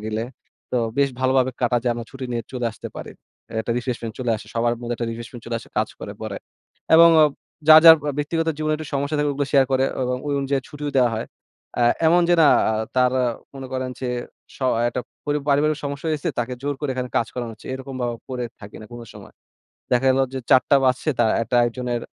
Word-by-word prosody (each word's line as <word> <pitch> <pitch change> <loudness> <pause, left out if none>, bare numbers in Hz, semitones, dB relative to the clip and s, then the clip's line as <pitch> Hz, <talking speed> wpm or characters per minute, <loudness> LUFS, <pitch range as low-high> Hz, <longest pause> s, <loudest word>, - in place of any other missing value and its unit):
গেলে 110 +1 -2 0.5
তো - - 0 0.2
বেশ 140 - +4
ভালোভাবে 130 0 +2
কাটা 120 0 +2
যায় 120 -1 +1
আমরা 120 0 -5
ছুটি 135 -1 -7
নিয়ে 115 -1 -2
চলে 125 -2 -2
আসতে - - -8
পারি। - - -7 0.5
একটা 115 - -2
রিফ্রেশমেন্ট 120 -3 -4
চলে 125 -2 -1
আসে 110 0 -12
সবার 120 +1 +1
মধ্যে 120 0 -3
একটা 120 - -3
রিফ্রেশমেন্ট 115 +1 -8
চলে 115 0 -2
আসে - - -14
কাজ - - +1
করে - - -6
পরে। - - -5 0.6
এবং 170 +1 +9
ও - - +8 0.4
যার, 155 0 +11
যার 160 -1 +11
আ - - -5
ব্যক্তিগত 165 +2 -1
জীবনে 155 0 0
একটু 155 0 -7
সমস্যা 140 +2 -1
থাকে 145 0 +1
ওগুলা 140 0 -2
শেয়ার 135 -2 +5
করে 130 0 +3 0.2
এবং 125 0 -1
ওই 145 - 0
অনুযায়ী 135 0 0
ছুটিও 145 -1 -5
দেওয়া 125 -3 +4
হয়। 110 - -4 0.5
আ - - +4 0.2
এমন 175 +2 +5
যে 175 - +5
না - - +7 0.2
আ - - 0 0.2
তার 125 0 +4
অ - - +2 0.3
মনে 135 -1 -7
করেন 130 0 -2
যে 130 - -2 0.5
স - - -18 0.3
একটা 125 - -3 0.2
পরি 145 0 0
পারিবারিক 150 +2 +2
সমস্যা 140 +3 -4
হইছে 155 +3 -2
তাকে 120 +1 -1
জোর 145 0 -1
করে 145 - -2
এখানে 125 -1 -4
কাজ 115 - +2
করানো 120 -2 -4
হচ্ছে 110 - -15
এরকম 130 0 -8
ভাও 120 -1 -1
করে 125 -2 -3 0.2
থাকি 100 -1 -11
না - - -10
কোন 120 - -8
সময়। - - -13 0.6
দেখা 125 +1 +2
গেল 130 - +3
যে 135 - -3
৪ঃ০০ 130 +1 +5
বাজছে 130 +4 +1
তারা 115 -2 +3
একটা 115 - -2
একজনের 120 0 -3
130 Hz, 220 wpm, -22 LUFS, 120-145 Hz, 0.6 s, যার